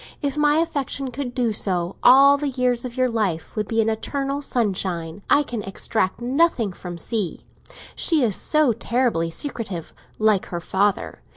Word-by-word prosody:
If 285 Hz, -2 st, -2 dB
my 295 Hz, 0 st, +3 dB
affection 280 Hz, -4 st, -1 dB
could 245 Hz, -1 st, -5 dB
do 240 Hz, -4 st, +1 dB
so, 180 Hz, -3 st, -1 dB
all 275 Hz, +3 st, +7 dB
the 285 Hz, 0 st, -2 dB
years 250 Hz, -2 st, 0 dB
of 250 Hz, 0 st, -7 dB
your 255 Hz, 0 st, +3 dB
life 210 Hz, -9 st, -2 dB
would 210 Hz, -1 st, -2 dB
be 225 Hz, 0 st, +1 dB
an 220 Hz, -, 0 dB
eternal 275 Hz, +5 st, -2 dB
sunshine. 190 Hz, -, -2 dB
I 290 Hz, -, +5 dB
can 240 Hz, -6 st, -5 dB
extract 195 Hz, 0 st, -2 dB
nothing 245 Hz, -, +1 dB
from 175 Hz, -1 st, -8 dB
C.; 195 Hz, +1 st, -2 dB, 0.5 s
she 320 Hz, -5 st, +2 dB
is 215 Hz, -5 st, +2 dB
so 305 Hz, -6 st, +2 dB
terribly 230 Hz, -8 st, 0 dB
secretive, 200 Hz, -, -5 dB, 0.2 s
like 215 Hz, -3 st, +2 dB
her 175 Hz, -, -4 dB
father. 200 Hz, +4 st, -1 dB
235 Hz, 165 wpm, -22 LUFS, 195-275 Hz, 0.5 s, all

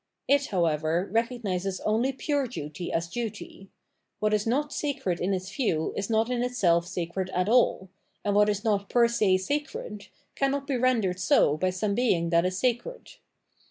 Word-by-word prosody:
It, 280 Hz, 0 st, +3 dB
however, 165 Hz, 0 st, 0 dB
recognises 205 Hz, -5 st, -1 dB
only 225 Hz, +5 st, +1 dB
pure 280 Hz, 0 st, -1 dB
duty 155 Hz, -, -6 dB
as 165 Hz, +1 st, -1 dB
duty: 205 Hz, -2 st, -6 dB, 0.5 s
what 215 Hz, 0 st, +1 dB
is 210 Hz, +1 st, +1 dB
not 290 Hz, +5 st, 0 dB
sacred 225 Hz, -, -2 dB
in 185 Hz, -, 0 dB
its 190 Hz, +2 st, -3 dB
view 165 Hz, -, 0 dB
is 200 Hz, +2 st, -3 dB
not 225 Hz, +2 st, +1 dB
in 245 Hz, -1 st, 0 dB
itself 180 Hz, -9 st, +2 dB
sacred 180 Hz, +1 st, -3 dB
at 180 Hz, +1 st, +1 dB
all, 230 Hz, -4 st, +3 dB, 0.4 s
and 205 Hz, -, +1 dB
what 210 Hz, +1 st, +4 dB
is 205 Hz, 0 st, -1 dB
not 205 Hz, -3 st, 0 dB
per 240 Hz, -1 st, +4 dB
se 210 Hz, -5 st, +2 dB
sacred 210 Hz, -2 st, -4 dB, 0.3 s
cannot 275 Hz, 0 st, 0 dB
be 275 Hz, -2 st, -1 dB
rendered 230 Hz, -8 st, +1 dB
so 175 Hz, -4 st, +3 dB
by 185 Hz, +4 st, 0 dB
some 200 Hz, +3 st, -1 dB
being 180 Hz, -8 st, +1 dB
that 170 Hz, +1 st, +3 dB
is 185 Hz, 0 st, -3 dB
sacred. 250 Hz, -, -2 dB
205 Hz, 170 wpm, -27 LUFS, 180-245 Hz, 0.5 s, what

